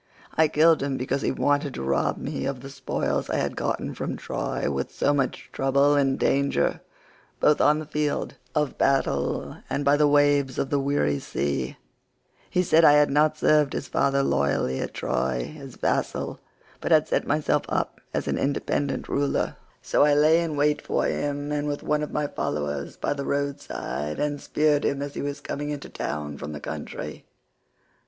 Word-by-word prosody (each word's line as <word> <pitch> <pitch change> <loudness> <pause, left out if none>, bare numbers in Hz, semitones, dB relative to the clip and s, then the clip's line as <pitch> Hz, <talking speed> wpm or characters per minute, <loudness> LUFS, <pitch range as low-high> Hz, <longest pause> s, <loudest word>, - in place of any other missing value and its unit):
I 160 0 +4
killed 160 +2 +4
him 140 -1 -1
because 130 +2 -1
he - - +1
wanted 145 0 0
to - - -4
rob 70 0 +1
me - - -3
of 135 -2 -3
the 135 +1 -9
spoils 135 -1 -2
I - - 0
had - - -1
got - - -1 0.2
from - - -3
Troy - - -3
with 70 -1 -3
so 145 - +1
much 135 -3 -1
trouble 140 +2 +3
and 135 -2 +2
danger 140 +1 +1 0.6
both 150 - +4
on 150 - +5
the 155 - -5
field 150 0 -1 0.2
of 150 -2 0
battle 70 - +1
and 145 - -1
by 140 +1 +5
the 150 0 +4
waves 145 -2 +3
of 135 - -1
the 145 - +2
weary 135 - +1
sea; 70 -2 -2 0.7
he 180 - +2
said 165 -1 +4
I 145 - +8
had 150 -1 +5
not 155 +2 +3
served 150 -2 +3
his - - -3
father 140 0 +2
loyally 70 - +1
at - - -4
Troy 65 - -1
as 135 -3 -10
vassal, - - -1 0.4
but - - -3
had 155 -1 +5
set - - 0
myself 150 0 +2
up - - -2
as - - -2
an - - 0
independent 140 0 -1
ruler, 140 0 0 0.3
so - - +2
I 145 0 +5
lay 155 +3 +5
in 160 -3 -2
wait 150 +1 +2
for - - 0
him 145 0 -2 0.2
with 145 -1 -3
one 150 0 +1
of 150 - -3
my 150 - 0
followers 75 - -3
by - - -1
the 140 -1 -5
road 140 0 -1
side, 75 +1 -4
and 145 -1 -1
speared 150 -1 +2
him 140 - 0
as 145 0 -6
he - - -4
was 145 0 -4
coming 145 +1 -4
into 145 -1 -5
town 75 -1 -4
from 75 +1 -6
the 75 - -6
country. - - -6
145 Hz, 185 wpm, -25 LUFS, 135-150 Hz, 0.7 s, I